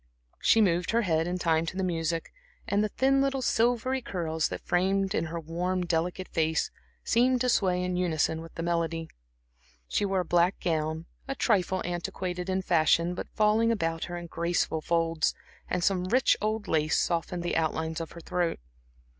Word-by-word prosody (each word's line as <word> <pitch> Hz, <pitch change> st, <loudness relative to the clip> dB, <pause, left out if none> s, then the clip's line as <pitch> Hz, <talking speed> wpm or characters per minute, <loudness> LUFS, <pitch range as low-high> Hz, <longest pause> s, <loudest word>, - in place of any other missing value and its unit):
She 225 Hz, -, +4 dB
moved 175 Hz, -3 st, +2 dB
her 235 Hz, +1 st, +2 dB
head 165 Hz, -3 st, +1 dB
in 180 Hz, +1 st, -1 dB
time 165 Hz, -2 st, +1 dB
to 185 Hz, -, -4 dB
the 190 Hz, -, 0 dB
music, 165 Hz, -2 st, -2 dB, 0.3 s
and 205 Hz, +1 st, +2 dB
the 215 Hz, -, 0 dB
thin 270 Hz, +4 st, +2 dB
little 275 Hz, -1 st, 0 dB
silvery 245 Hz, +3 st, +1 dB
curls 160 Hz, -7 st, -1 dB
that -, -, -7 dB
framed 195 Hz, +2 st, +1 dB
in 165 Hz, -, 0 dB
her 165 Hz, +1 st, -4 dB
worn, 175 Hz, +3 st, -2 dB
delicate 175 Hz, +2 st, -1 dB
face 160 Hz, -1 st, 0 dB, 0.3 s
seemed 250 Hz, +2 st, +3 dB
to 250 Hz, -, +2 dB
sway 180 Hz, -5 st, +2 dB
in 180 Hz, 0 st, -1 dB
unison 160 Hz, -2 st, 0 dB
with 165 Hz, 0 st, -12 dB
the 165 Hz, -, -4 dB
melody. 165 Hz, -1 st, -1 dB, 0.8 s
She -, -, 0 dB
wore 195 Hz, -2 st, +1 dB
a -, -, -5 dB
black 175 Hz, +3 st, +2 dB
gown, 160 Hz, -1 st, -1 dB, 0.2 s
a 270 Hz, -, -3 dB
trifle 190 Hz, -6 st, +1 dB
antiquated 180 Hz, +1 st, -3 dB
in 190 Hz, 0 st, 0 dB
fashion 170 Hz, 0 st, +3 dB
but -, -, -6 dB
falling 215 Hz, +2 st, +3 dB
about 165 Hz, -6 st, -1 dB
her 175 Hz, -, -5 dB
in 175 Hz, -, -6 dB
graceful 170 Hz, -1 st, -1 dB
folds, 165 Hz, -1 st, +1 dB, 0.3 s
and 180 Hz, -, -1 dB
some 185 Hz, -1 st, +2 dB
rich 245 Hz, +7 st, +3 dB
old 215 Hz, 0 st, -1 dB
lace 155 Hz, 0 st, +2 dB
softened 170 Hz, +1 st, -1 dB
the 175 Hz, -, -1 dB
outlines 160 Hz, 0 st, -1 dB
of 165 Hz, -, -7 dB
her 170 Hz, -, -10 dB
throat. 175 Hz, 0 st, -1 dB
175 Hz, 180 wpm, -28 LUFS, 165-195 Hz, 0.8 s, She